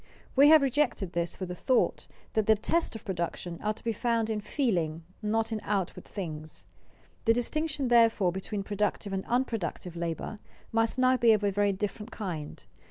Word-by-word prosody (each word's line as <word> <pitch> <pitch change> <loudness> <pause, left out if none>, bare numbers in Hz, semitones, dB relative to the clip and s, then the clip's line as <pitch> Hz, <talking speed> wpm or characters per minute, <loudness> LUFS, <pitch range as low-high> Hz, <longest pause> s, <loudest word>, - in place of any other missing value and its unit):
We 280 +2 +7
have 310 -1 +8
rejected 255 - 0
this 170 0 -1
for 185 - -4
the 180 - -5
thought 250 +7 +1 0.3
that 220 -2 +1
the 220 - +6
tests 235 +8 0
of 220 - -8
production 175 -2 -3
are 215 0 -1
to - - -13
be 230 -1 0
found 230 0 0
in 210 -1 -2
feeling, 175 - -1 0.2
not 225 +1 0
in 220 -1 -2
outward 195 -4 -2
things. 155 - -6 0.6
The 225 - +6
distinction, 285 +3 -1
therefore, 230 -6 +4
between 195 +2 -4
productive 205 0 -2
and 190 0 -1
unproductive 225 -8 -2
labor 170 +5 -4 0.3
must 225 +2 +2
now 255 0 +4
be 235 -2 +6
of 210 -1 +1
a 200 - +2
very 205 +1 +2
different 210 +3 -4
kind. 175 -11 -6
210 Hz, 175 wpm, -29 LUFS, 185-235 Hz, 0.6 s, have